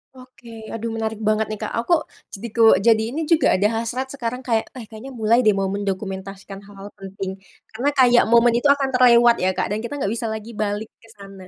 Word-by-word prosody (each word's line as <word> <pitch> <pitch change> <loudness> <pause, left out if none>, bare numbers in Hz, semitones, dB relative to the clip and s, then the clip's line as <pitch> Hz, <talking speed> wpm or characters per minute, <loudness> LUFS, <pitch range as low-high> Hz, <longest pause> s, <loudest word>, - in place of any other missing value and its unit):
Oke, 235 -3 -13
aduh 225 0 -4
menarik 220 -1 -4
banget 215 0 +1
nih 215 - -4
Kak. - - -4
Aku 310 +6 +1 0.3
jadi 220 +4 -7
ko, 225 -1 +5
jadi 225 -1 +5 0.2
ini 325 - -2
juga 325 - +4
ada 200 +3 +2
hasrat 255 +3 -4
sekarang 250 -1 -5
kayak, 225 -3 -1
eh 250 - -8
kayaknya 220 +4 -11
mulai 225 +2 +2
deh 215 -5 +3
mau 195 -1 -1
mendokumentasikan 195 0 -5
hal-hal 200 0 -11
penting. 195 0 -7 0.3
Karena 245 +6 -1
kayak 245 -2 +5
momen 235 +1 +5
itu 240 +5 +1
akan 280 -1 +2
terlewat 240 -2 +5
ya, 185 0 0
Kak 185 - -2
dan 210 - -1
kita 235 +5 -6
enggak 235 -8 -2
bisa 230 0 -3
lagi 220 +1 -6
balik 210 0 -4
ke 225 - -21
sana, 195 -2 -13
225 Hz, 210 wpm, -21 LUFS, 205-240 Hz, 0.3 s, ko